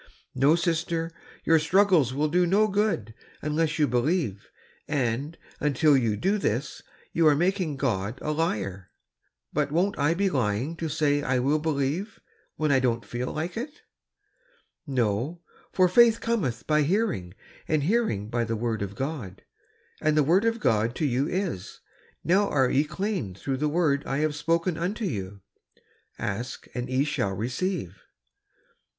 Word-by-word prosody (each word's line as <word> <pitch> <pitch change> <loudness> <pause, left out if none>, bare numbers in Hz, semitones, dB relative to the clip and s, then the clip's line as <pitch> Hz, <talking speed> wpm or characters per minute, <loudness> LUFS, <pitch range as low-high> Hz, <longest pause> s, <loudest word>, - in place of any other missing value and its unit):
'^ - - -22 0.3
"No, 140 +5 +4
sister, 165 -1 -1 0.3
your 165 -1 +4
struggles 180 - +3
will 145 +4 0
do 175 +3 +2
no 205 +4 +4
good 200 - 0 0.3
unless 155 +1 0
you 150 -2 +3
believe; 125 - 0 0.4
and, 140 +2 -1 0.2
until 150 +1 +3
you 115 -5 +1
do 200 - +1
this, 130 - -2 0.3
you 165 -1 +4
are 150 - +6
making 175 -1 0
God 110 -4 -1
a 150 - -2
liar.'' 100 - -2 0.6
"But 145 -1 0
won't 185 +5 +1
I 145 +4 +2
be 200 +2 +1
lying 130 - 0
to 160 0 -3
say 145 -1 +1
I 130 -2 0
will 140 +5 +2
believe, 155 +6 -2 0.4
when 155 -2 0
I 135 - +5
dcMi't 120 -4 0
feel 120 +4 -4
like 165 +3 -4
it?" 285 +7 -6 1.0
"No, 130 +6 -1 0.3
'for 185 -1 +4
faith 230 +4 +5
cometh 155 - -1
by 150 0 +3
hearing 150 - 0 0.3
and 155 -2 +1
hearing 180 - +1
by 120 +1 -1
the 115 0 -2
word 110 -1 -2
of 100 0 -4
God; 130 - -5 0.3
' - - -34
and 155 0 +2
the 150 - +5
word 180 +9 +3
of 230 0 +1
God 115 - +1
to 155 - -1
you 135 +1 +1
is, 180 - -3 0.4
'Now 195 +4 +3
are 130 -3 +2
ye 145 +3 +3
clean 155 - -3
through 135 +7 -3
the 150 +2 0
word 150 -3 +1
I 135 - -1
have 155 - -1
spoken 165 +3 0
unto 205 +6 -2
you.' 100 - -4 0.8
'Ask 115 +5 -4
and 125 0 -4
ye 130 +2 +2
shall 100 -9 -1
receive." 120 - -3
150 Hz, 160 wpm, -26 LUFS, 120-170 Hz, 1.0 s, are